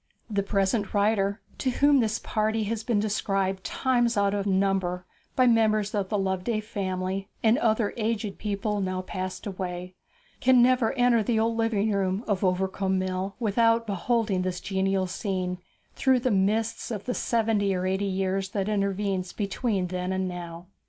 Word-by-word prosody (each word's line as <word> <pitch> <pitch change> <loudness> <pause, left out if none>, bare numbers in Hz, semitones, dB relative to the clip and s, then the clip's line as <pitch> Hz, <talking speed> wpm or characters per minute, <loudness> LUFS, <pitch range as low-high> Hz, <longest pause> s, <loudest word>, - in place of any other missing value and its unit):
The 200 -1 +1
present 200 +1 0
writer, 200 0 +2 0.2
to 260 - 0
whom 285 +2 +4
this 220 -2 +1
party 220 0 -1
has 220 +1 -3
been 230 -3 +1
described 195 -2 -1
times 240 -3 +1
out 200 0 +2
of 200 0 -1
number 190 -2 +1 0.3
by 255 - +4
members 215 -3 +3
of 200 -3 -1
the 210 - 0
Loveday 195 +3 -1
family 195 -2 -3
and 225 +4 +4
other 220 -3 +1
aged 215 -2 -2
people 210 0 -2
now 185 -1 -2
passed 185 0 -5
away, 180 -2 -5 0.5
can 260 -1 +5
never 250 -2 +4
enter 245 -3 +3
the 220 +1 +1
old 225 +1 +1
living 225 -2 +1
room 195 +1 0
of 200 -3 0
Overcombe 190 +1 0
Mill 185 +1 -2
without 230 +1 +2
beholding 210 0 0
the 185 0 0
genial 190 +1 0
scene 185 -1 -3 0.3
through 260 -2 +2
the 255 - +1
mists 210 +3 0
of 210 -4 -5
the 250 - -1
seventy 220 -5 +1
or 180 0 -2
eighty 190 +2 0
years 190 0 -1
that 195 0 -2
intervene 200 -2 0
between 205 -1 -1
then 180 0 -3
and 190 0 -1
now. 175 -1 -7
200 Hz, 165 wpm, -26 LUFS, 190-225 Hz, 0.5 s, can